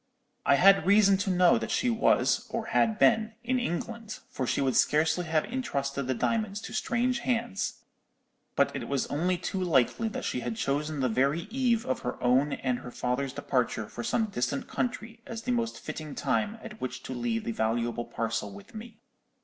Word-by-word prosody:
I 140 Hz, -, +6 dB
had 190 Hz, +2 st, +6 dB
reason 200 Hz, -1 st, +6 dB
to 200 Hz, 0 st, -2 dB
know 180 Hz, -1 st, +5 dB
that -, -, -4 dB
she 250 Hz, -, +1 dB
was, 225 Hz, -, +2 dB
or -, -, -3 dB
had 220 Hz, -2 st, +3 dB
been, 220 Hz, -1 st, +3 dB
in 255 Hz, +2 st, +1 dB
England, 225 Hz, +2 st, -4 dB
for 130 Hz, -, -3 dB
she -, -, 0 dB
would 135 Hz, -2 st, +1 dB
scarcely 160 Hz, +3 st, +3 dB
have 160 Hz, -1 st, +1 dB
intrusted 140 Hz, -, -2 dB
the 130 Hz, -, 0 dB
diamonds 215 Hz, -, -1 dB
to 220 Hz, -, -8 dB
strange 245 Hz, 0 st, 0 dB
hands; 235 Hz, -4 st, -2 dB, 0.7 s
but -, -, +2 dB
it -, -, -4 dB
was 140 Hz, -2 st, 0 dB
only 175 Hz, +5 st, +1 dB
too 185 Hz, +2 st, -3 dB
likely 165 Hz, -, +2 dB
that 220 Hz, -, -4 dB
she -, -, -1 dB
had 120 Hz, -2 st, -3 dB
chosen 145 Hz, +4 st, -1 dB
the 130 Hz, -, +2 dB
very 135 Hz, +7 st, +1 dB
eve 240 Hz, -3 st, +1 dB
of 130 Hz, -, -1 dB
her -, -, -4 dB
own 130 Hz, +4 st, +3 dB
and 125 Hz, -2 st, -1 dB
her 125 Hz, -, -8 dB
father's 125 Hz, +2 st, -2 dB
departure 125 Hz, -6 st, -1 dB
for 120 Hz, -, -7 dB
some 225 Hz, -, +1 dB
distant 140 Hz, -, -2 dB
country 235 Hz, -1 st, -3 dB
as 225 Hz, -1 st, -6 dB
the 250 Hz, -, -1 dB
most 235 Hz, -2 st, -1 dB
fitting 155 Hz, -2 st, -6 dB
time 215 Hz, +1 st, 0 dB
at 220 Hz, -1 st, -10 dB
which 130 Hz, -, -4 dB
to -, -, -5 dB
leave 120 Hz, -2 st, -1 dB
the -, -, -2 dB
valuable 115 Hz, +1 st, -1 dB
parcel 115 Hz, -3 st, -3 dB
with 100 Hz, 0 st, -13 dB
me. 220 Hz, 0 st, -9 dB
170 Hz, 190 wpm, -28 LUFS, -, 0.7 s, I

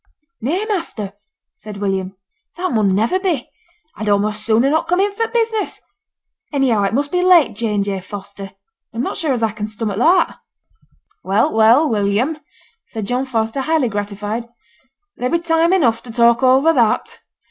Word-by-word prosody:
'Nay, 340 Hz, -, -1 dB
master,' 335 Hz, -, -3 dB, 0.4 s
said 210 Hz, -1 st, -9 dB
William, 195 Hz, -1 st, -2 dB, 0.4 s
'that 365 Hz, +1 st, -2 dB
mun 210 Hz, -5 st, +2 dB
never 230 Hz, -, +1 dB
be. 355 Hz, -9 st, -1 dB, 0.5 s
I'd 215 Hz, -, -5 dB
a'most 210 Hz, +1 st, 0 dB
sooner 230 Hz, +5 st, +2 dB
not 315 Hz, -, +1 dB
come 360 Hz, +2 st, +1 dB
in 400 Hz, +1 st, +1 dB
for 455 Hz, +2 st, -1 dB
the -, -, -18 dB
business. 450 Hz, -3 st, -1 dB, 0.7 s
Anyhow, 265 Hz, -7 st, +2 dB
it 195 Hz, -, -1 dB
must 285 Hz, +2 st, -1 dB
be 360 Hz, -, +1 dB
'late 345 Hz, -, +5 dB
J. 215 Hz, -1 st, -2 dB
and 200 Hz, -, +1 dB
J. 200 Hz, -1 st, -3 dB
Foster,' 200 Hz, +1 st, -8 dB
and 195 Hz, -, -13 dB, 0.4 s
I'm 235 Hz, -, -1 dB
not -, -, -3 dB
sure 315 Hz, -4 st, -1 dB
as 240 Hz, -3 st, -1 dB
I 220 Hz, -, +1 dB
can 210 Hz, 0 st, -5 dB
stomach 215 Hz, -1 st, -4 dB
that.' 340 Hz, +9 st, +3 dB, 0.8 s
'Well, 200 Hz, +4 st, +1 dB
well, 230 Hz, +8 st, +5 dB
William,' 220 Hz, +7 st, 0 dB, 0.5 s
said 220 Hz, -2 st, -5 dB
John 250 Hz, +5 st, -1 dB
Foster, 225 Hz, +1 st, -1 dB
highly 310 Hz, -3 st, +1 dB
gratified, 205 Hz, +3 st, -4 dB, 0.7 s
'there 250 Hz, -, -1 dB
be 340 Hz, -, +2 dB
time 335 Hz, 0 st, +1 dB
enough 240 Hz, -12 st, +2 dB
to 235 Hz, -, -10 dB
talk 235 Hz, +1 st, +3 dB
over 265 Hz, +5 st, +4 dB
that. 235 Hz, -7 st, +1 dB
235 Hz, 175 wpm, -18 LUFS, 210-320 Hz, 0.8 s, late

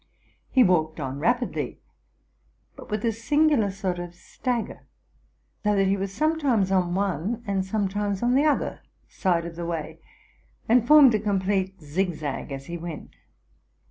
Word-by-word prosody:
He 255 Hz, -, +5 dB
walked 160 Hz, -5 st, +1 dB
on 135 Hz, -1 st, -4 dB
rapidly, 240 Hz, -, -1 dB, 1.0 s
but -, -, -12 dB
with 215 Hz, +1 st, -2 dB
a 230 Hz, -, +2 dB
singular 265 Hz, 0 st, +2 dB
sort 190 Hz, -2 st, -3 dB
of 175 Hz, 0 st, -7 dB
stagger; 240 Hz, +5 st, -4 dB, 0.8 s
so 210 Hz, -1 st, +2 dB
that 195 Hz, -1 st, +3 dB
he 195 Hz, +1 st, +2 dB
was 195 Hz, 0 st, -3 dB
sometimes 270 Hz, -6 st, +1 dB
on 180 Hz, -2 st, +1 dB
one 200 Hz, +4 st, -1 dB
and 195 Hz, -2 st, 0 dB
some 200 Hz, +1 st, -1 dB
times 205 Hz, +1 st, -2 dB
on 240 Hz, +1 st, +3 dB
the 280 Hz, +3 st, +3 dB
other 300 Hz, -, 0 dB, 0.3 s
side 175 Hz, -3 st, 0 dB
of 170 Hz, -1 st, -7 dB
the 170 Hz, -, -5 dB
way, 160 Hz, -1 st, -4 dB, 0.7 s
and 240 Hz, +1 st, +4 dB
formed 290 Hz, -4 st, +8 dB
a 215 Hz, -, +2 dB
complete 195 Hz, -2 st, -1 dB
zigzag 155 Hz, -3 st, -3 dB
as 135 Hz, 0 st, -6 dB
he 170 Hz, +2 st, -6 dB
went. 165 Hz, -2 st, -7 dB
195 Hz, 155 wpm, -25 LUFS, 175-230 Hz, 1.0 s, formed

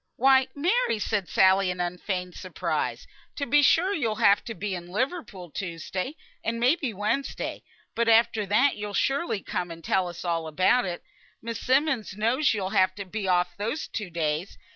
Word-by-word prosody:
"Why, 265 Hz, +1 st, +5 dB
Mary!" 365 Hz, -, +1 dB
said 205 Hz, -3 st, -2 dB
Sally, 190 Hz, 0 st, +4 dB
in 180 Hz, 0 st, -4 dB
unfeigned 180 Hz, +1 st, -3 dB
surprise. -, -, -3 dB, 0.3 s
"To 280 Hz, -, -2 dB
be 290 Hz, +4 st, +4 dB
sure 355 Hz, +7 st, +4 dB
you'll 230 Hz, -, -1 dB
have 200 Hz, -1 st, +4 dB
to 230 Hz, -, -5 dB
be 200 Hz, +2 st, -3 dB
in 175 Hz, -1 st, -6 dB
Liverpool, 205 Hz, -, -3 dB
Tuesday, 185 Hz, -, -4 dB, 0.3 s
and 230 Hz, +1 st, -2 dB
may 250 Hz, +6 st, +4 dB
be 280 Hz, -8 st, -3 dB
Wednesday; 215 Hz, +7 st, -2 dB, 0.3 s
but 235 Hz, 0 st, +1 dB
after 225 Hz, -2 st, +4 dB
that 245 Hz, +8 st, +3 dB
you'll 205 Hz, -1 st, -5 dB
surely 275 Hz, -, 0 dB
come, 180 Hz, -4 st, -3 dB
and 165 Hz, 0 st, -9 dB
tell 185 Hz, +2 st, +1 dB
us 175 Hz, +1 st, -8 dB
all 165 Hz, -2 st, -1 dB
about 185 Hz, +10 st, +3 dB
it. 175 Hz, -2 st, -5 dB, 0.4 s
Miss 230 Hz, -1 st, -5 dB
Simmonds 260 Hz, -7 st, +1 dB
knows 245 Hz, +7 st, +2 dB
you'll 195 Hz, -3 st, -2 dB
have 185 Hz, 0 st, +3 dB
to 200 Hz, -, -6 dB
be 195 Hz, +1 st, -4 dB
off 180 Hz, -1 st, +1 dB
those 225 Hz, +10 st, -3 dB
two 210 Hz, -4 st, -5 dB
days. 160 Hz, +1 st, -2 dB
210 Hz, 180 wpm, -26 LUFS, 180-255 Hz, 0.4 s, Why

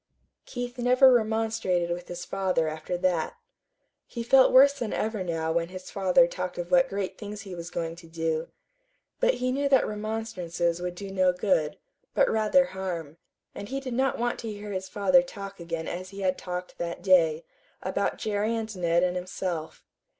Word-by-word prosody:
Keith 245 Hz, 0 st, -5 dB
never 255 Hz, +2 st, +6 dB
remonstrated 220 Hz, -6 st, +1 dB
with 175 Hz, 0 st, -4 dB
his 175 Hz, 0 st, -6 dB
father 185 Hz, -4 st, 0 dB
after 155 Hz, +3 st, -3 dB
that. 175 Hz, -3 st, 0 dB, 0.7 s
He 235 Hz, -, -5 dB
felt 260 Hz, +2 st, +6 dB
worse 275 Hz, +2 st, +8 dB
than 245 Hz, -6 st, -4 dB
ever 215 Hz, -3 st, -1 dB
now 165 Hz, -2 st, -1 dB
when 170 Hz, +1 st, 0 dB
his 185 Hz, 0 st, -9 dB
father 185 Hz, -3 st, +4 dB
talked 180 Hz, +1 st, -5 dB
of 175 Hz, 0 st, -5 dB
what 175 Hz, -1 st, +5 dB
great 195 Hz, -1 st, -4 dB
things 210 Hz, -1 st, -6 dB
he 195 Hz, -2 st, -8 dB
was 170 Hz, -1 st, -6 dB
going 165 Hz, -1 st, -3 dB
to 170 Hz, -1 st, -13 dB
do; 160 Hz, 0 st, -2 dB, 0.7 s
but -, -, +3 dB
he 255 Hz, 0 st, -1 dB
knew 280 Hz, +2 st, 0 dB
that 270 Hz, -2 st, +5 dB
remonstrances 200 Hz, -6 st, -2 dB
would 180 Hz, 0 st, -3 dB
do 195 Hz, +1 st, -7 dB
no 185 Hz, -1 st, +3 dB
good, 180 Hz, -5 st, 0 dB, 0.4 s
but -, -, +4 dB
rather 220 Hz, +5 st, +4 dB
harm; 175 Hz, -, -5 dB, 0.4 s
and 200 Hz, -, -7 dB
he 270 Hz, -, -2 dB
did 260 Hz, -2 st, -5 dB
not 265 Hz, +2 st, +1 dB
want 240 Hz, +1 st, -1 dB
to 225 Hz, -2 st, -4 dB
hear 205 Hz, 0 st, -7 dB
his 190 Hz, -1 st, -4 dB
father 215 Hz, +7 st, +4 dB
talk 200 Hz, -7 st, -8 dB
again 165 Hz, -1 st, -4 dB
as 185 Hz, +2 st, -5 dB
he 200 Hz, 0 st, -8 dB
had 185 Hz, -1 st, +1 dB
talked 180 Hz, 0 st, -6 dB
that 170 Hz, 0 st, -4 dB
day, 170 Hz, -4 st, +4 dB, 0.4 s
about 190 Hz, +2 st, -1 dB
Jerry 215 Hz, +2 st, -1 dB
and 220 Hz, -2 st, -4 dB
Ned 170 Hz, -1 st, +2 dB
and 180 Hz, 0 st, +1 dB
himself. 180 Hz, -3 st, -4 dB
190 Hz, 185 wpm, -27 LUFS, 175-220 Hz, 0.7 s, worse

